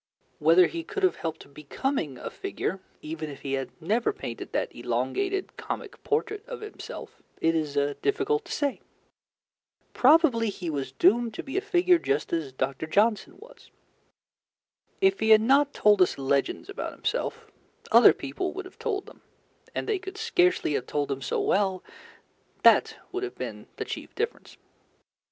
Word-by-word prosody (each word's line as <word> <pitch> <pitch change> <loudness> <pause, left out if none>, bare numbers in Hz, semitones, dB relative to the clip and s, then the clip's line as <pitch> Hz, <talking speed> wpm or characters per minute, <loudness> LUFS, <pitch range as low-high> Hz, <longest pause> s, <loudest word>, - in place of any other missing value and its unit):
Whether 165 +4 +6
he 335 - -4
could 400 +3 -5
have 370 - +3
helped 160 -3 -6
becoming 150 - -3
a - - -6
figure, 385 - -3 0.2
even 155 0 -5
if 140 - -10
he 135 -1 -3
had 135 -1 -2
never 215 - +1
painted 410 - -7
that - - -2
elongated 390 -1 -2
comic - - -6
portrait 430 -1 -1
of - - -7
himself, 425 0 -9 0.2
it 165 - +2
is 155 -3 -1 0.3
difficult 415 +1 +1
to - - -10
say. 285 -2 -1 1.1
Probably 260 -5 +5
he 180 -4 -4
was 135 -3 -3
doomed 220 - +3
to - - -5
be 270 - -7
a 390 - +2
figure 365 -3 +3
just 140 - -1
as 160 -5 -1
Dr. 135 +3 -3
Johnson 210 +6 +2
was. - - -16 1.3
If 385 0 +4
he 220 - +1
had 220 -1 +9
not 275 +5 +4
told 210 -6 +4
us 180 - +3
legends 140 - 0
about 400 - -5
himself, - - -3 0.5
other - - +9
people 370 -1 -4
would 390 0 -6
have 370 - -14
told 400 -3 -2
them, - - -15 0.5
and - - -2
they 425 -3 0
could 385 +2 -8
scarcely 365 - +2
have 130 -3 -2
told 145 -1 -1
them 135 -1 -3
so - - -1
well: 190 -2 +1 0.8
that - - +5
would 375 - -3
have 390 -1 -4
been - - -6
the - - -4
chief - - -7
difference. 455 +1 -4
235 Hz, 165 wpm, -27 LUFS, -, 1.3 s, had